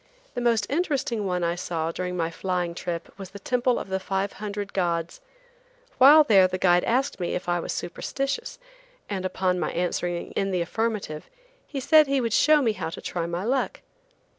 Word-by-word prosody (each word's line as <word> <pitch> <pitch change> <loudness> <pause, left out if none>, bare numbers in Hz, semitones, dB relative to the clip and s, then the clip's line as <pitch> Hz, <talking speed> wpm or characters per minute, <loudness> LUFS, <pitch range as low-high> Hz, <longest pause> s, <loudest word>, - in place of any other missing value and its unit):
The 245 - -3
most 230 -3 +2
interesting 270 - -1
one 180 -1 -1
I 170 0 +1
saw 165 -2 -3
during 180 +1 -4
my 165 -1 -1
flying 180 -1 -2
trip 170 -1 -5
was 190 -2 -7
the 200 - -10
Temple 250 +4 +1
of - - -5
the 190 0 -1
Five 195 +1 -2
Hundred 205 0 -5
Gods. 170 - -1 0.8
While 295 +4 +9
there 195 -8 +5
the 185 0 -3
guide 175 -1 +4
asked 260 +2 0
me 175 - -2
if 180 - -5
I 175 0 +1
was - - -4
superstitious, 275 - -3 0.5
and 190 -2 -3
upon 185 -1 0
my - - -1
answering 175 0 -2
in 195 - -1
the 180 -2 0
affirmative, 200 -4 -3 0.4
he 280 - -4
said 310 +3 +5
he 275 0 +1
would 230 -3 -1
show 300 +3 +5
me 230 - +3
how 210 - -4
to - - -8
try 170 -1 -3
my 170 +2 -3
luck. 260 +4 -1
190 Hz, 190 wpm, -25 LUFS, 175-245 Hz, 0.8 s, While